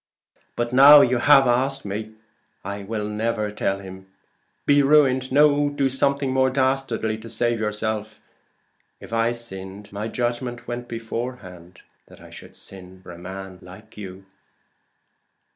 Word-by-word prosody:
"But 120 +1 -2
now 145 +3 +9
you 125 -2 +2
have 135 +1 +6
asked 130 +2 0
me, 105 +2 -5 0.5
I 100 +1 -5
will 105 +1 -4
never 105 0 -2
tell 100 -1 -1
him! 95 -1 -11 0.6
Be 145 0 +5
ruined 135 -3 +3
no 145 +1 +4
do 140 -2 0
something 140 0 0
more 130 0 +3
dastardly 130 -4 -1
to 115 +1 -11
save 120 +1 0
yourself. 110 0 -3 0.8
If - - -11
I 115 +1 +2
sinned, 100 -4 -8
my 105 +2 -4
judgment 120 +1 -3
went 120 0 -5
beforehand 115 -7 -7 0.2
that - - -17
I - - -15
should - - -13
sin 95 -1 -10
for 90 - -11
a 85 - -11
man 95 +1 -8
like 95 +5 -14
you." 95 -2 -9
115 Hz, 145 wpm, -23 LUFS, 100-130 Hz, 0.8 s, now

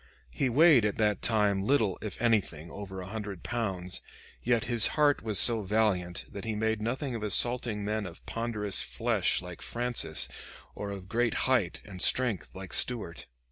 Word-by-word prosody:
He 130 - -1
weighed 145 -1 +5
at 105 -1 -1
that 105 -2 0
time 105 -3 +1
little, 110 -3 +1
if 105 - -7
anything, 95 -9 -1
over 95 -2 -8
a - - -8
hundred 105 -3 -7
pounds, 95 -6 -2 0.4
yet 120 -2 +1
his 120 -3 +4
heart 145 -1 +3
was 110 -3 -3
so 115 -2 +7
valiant 95 -4 -1
that 100 - -8
he 110 -1 -3
made 110 0 -1
nothing 130 +4 -3
of 115 - -5
assaulting 110 0 +2
men 105 -1 -2
of 85 - -13
ponderous 110 -4 -1
flesh - - 0
like 90 -1 -10
Francis, 120 0 0 0.5
or 100 - -6
of 95 -2 -8
great 115 +3 0
height 120 -10 0
and 95 -3 -8
strength 120 -8 +3
like 95 0 -9
Stuart. 105 -9 0
105 Hz, 170 wpm, -29 LUFS, 95-120 Hz, 0.5 s, so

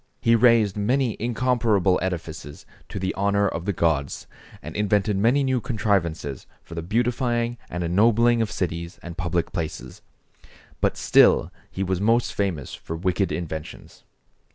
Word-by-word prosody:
He 115 0 +4
raised 115 -4 +4
many 120 +3 +1
incomparable 115 -5 +1
edifices 80 -5 -5 0.2
to - - -6
the 95 0 -2
honor 100 +1 +1
of 85 -2 -4
the 100 - +1
gods, 80 -6 -1 0.4
and - - -8
invented 105 0 +1
many 120 +8 +3
new 130 -2 0
contrivances 85 - -1 0.2
for - - -12
the 85 - -4
beautifying 120 +4 0
and 90 0 -3
ennobling 115 +6 +3
of 110 - 0
cities 85 -1 -4
and 85 -1 -7
public 85 -1 -1
places, 80 -2 -5 0.8
but - - 0
still - - +4 0.2
he 95 - -3
was 95 -1 -1
most 115 +3 +2
famous 90 -10 -2
for 80 - -6
wicked 95 +3 0
inventions. 80 -3 -6
100 Hz, 145 wpm, -24 LUFS, 85-115 Hz, 0.8 s, He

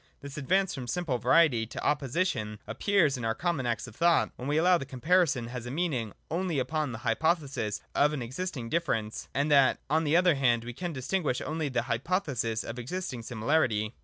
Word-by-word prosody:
This 140 0 -8
advance 185 +6 +1
from 130 -3 -6
simple 160 -5 -1
variety 130 -10 +4
to - - -7
opposition 135 - 0
ap - - -7
pears 175 -10 +3
in 120 - -6
our 115 0 0
common 145 -2 -1
acts 120 - -1
of 120 -3 -12
thought, 170 0 +3
when 125 - -6
we 145 +1 +1
allow 175 +2 +4
that 135 - -6
comparison 135 -3 +1
has 120 -1 -6
a - - -4
meaning 135 - -2 0.2
only 175 -1 -1
upon 140 +2 -1
the 115 - -5
hypothesis 135 - 0
of 145 +1 +3
an 145 -5 -3
existing 130 0 -4
difference, 115 -8 -2
and 145 +2 +1
that 140 -2 +5
on 160 +1 +3
the 155 +2 +3
other 180 -1 +5
hand 120 -4 +2
we 120 +1 -6
can 175 +7 -4
distinguish 145 0 -1
only 155 -1 -2
on 135 - -6
the 120 - +2
hypothesis 125 - -1
of 120 +2 -6
existing 130 0 -4
similarity. 115 -2 0
140 Hz, 200 wpm, -29 LUFS, 120-170 Hz, 0.2 s, that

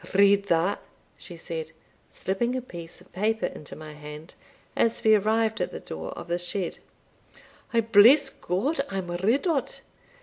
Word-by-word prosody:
"Read 200 0 +5
that," 170 +3 +1 0.3
she 175 - -10
said, 165 -1 -6 0.4
slipping 235 +6 -1
a 255 - -1
piece 170 -7 -10
of - - -21
paper 220 +4 0
into 150 - -7
my 155 -1 -9
hand, 150 +2 -10 0.4
as 230 - +1
we 220 - +6
arrived 220 +1 +2
at - - -1
the - - -6
door 80 0 -7
of - - -9
the 175 +1 -1
shed; 175 0 -3 0.9
"I 230 - +3
bless 230 +6 +6
God 260 - -1
I 195 - -4
am 180 -2 -4
rid 210 - +1
o't. 315 -7 -1
200 Hz, 165 wpm, -26 LUFS, 170-225 Hz, 0.9 s, we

